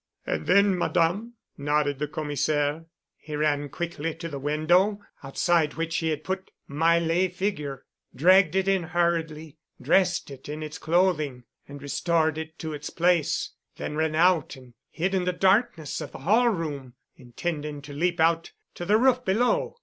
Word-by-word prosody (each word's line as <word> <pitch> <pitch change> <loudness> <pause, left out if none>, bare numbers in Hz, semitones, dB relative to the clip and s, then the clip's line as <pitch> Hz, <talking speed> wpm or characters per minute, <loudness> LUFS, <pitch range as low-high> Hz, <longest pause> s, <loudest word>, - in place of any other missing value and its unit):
"And 80 0 -3
then, 200 0 +5
Madame?" 180 +7 0 0.2
nodded 145 -1 0
the 150 - -1
Commissaire. 150 0 -1 0.3
"He 150 - -7
ran 145 -1 0
quickly 165 -2 -4
to 165 0 -6
the 140 -3 -6
window, 175 +8 +2 0.2
outside 155 +3 +1
which 165 +1 -2
he 165 - 0
had 155 -1 -2
put 190 +2 -4 0.2
my 165 +4 +3
lay 170 +2 +1
figure, 175 -8 -4 0.3
dragged 180 +4 +5
it 190 0 +1
in 195 -1 +2
hurriedly, 165 -3 -2 0.2
dressed 175 +4 +2
it 135 +1 -11
in 155 +1 -5
its 155 +3 -7
clothing 155 -6 +1 0.2
and 140 0 -10
restored 160 +2 0
it 160 +1 -8
to 160 -2 -5
its 150 0 -6
place, 170 -2 +1 0.3
then 150 - -5
ran 160 0 0
out 175 0 +3
and 130 -2 -16 0.2
hid 185 +4 -2
in 185 -2 +1
the 180 - +1
darkness 190 - +1
of - - -7
the - - -7
hall 225 - +4
room, 145 - -4 0.2
intending 145 +4 -5
to 145 0 -9
leap 170 +4 0
out 165 +1 +2 0.2
to 175 - -6
the 210 +4 +4
roof 255 +1 +3
below. 245 - +1
160 Hz, 165 wpm, -26 LUFS, 150-180 Hz, 0.3 s, then